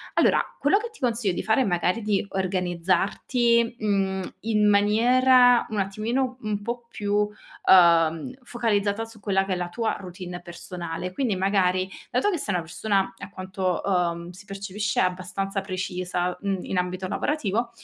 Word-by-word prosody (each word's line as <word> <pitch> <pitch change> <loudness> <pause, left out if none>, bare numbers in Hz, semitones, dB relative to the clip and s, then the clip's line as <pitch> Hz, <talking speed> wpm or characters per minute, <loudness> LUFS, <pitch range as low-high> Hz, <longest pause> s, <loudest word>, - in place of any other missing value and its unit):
Allora, - - +4 0.2
quello 295 +9 +3
che 465 +2 -5
ti 440 - -19
consiglio 230 -7 0
di - - -3
fare 220 +5 +3
è - - +4
magari 180 +3 0
di 210 -2 0
organizzarti, 195 +6 +1
mhmm, 195 -3 -1
in 210 -1 +2
maniera 245 +4 +5
un 215 - -4
attimino 230 +6 -1
un 210 -1 -3
po' 235 +1 -5
più, 205 -3 -3 0.5
uhm, 170 +3 +5
focalizzata 225 -3 0
su 225 -1 -15
quella 195 -2 +1
che 195 - -1
è - - 0
la 175 -1 -3
tua 225 +5 -1
routine 180 -1 -8
personale. 175 0 -6
Quindi, 225 -2 0
magari, 185 -1 +1 0.2
dato 255 +12 +1
che 350 - -1
sei 205 -8 -2
una 175 - -1
persona, 195 +4 -1
a - - -8
quanto, 185 -1 -2
uhm, 175 -2 0
si 190 +3 -14
percepisce, 200 +2 -3
abbastanza 185 +2 -1
precisa, 180 -1 -3
mhmm, 195 -2 -2
in 190 - -3
ambito 185 +1 -3
lavorativo, 235 -3 -1
195 Hz, 160 wpm, -25 LUFS, 185-225 Hz, 0.5 s, maniera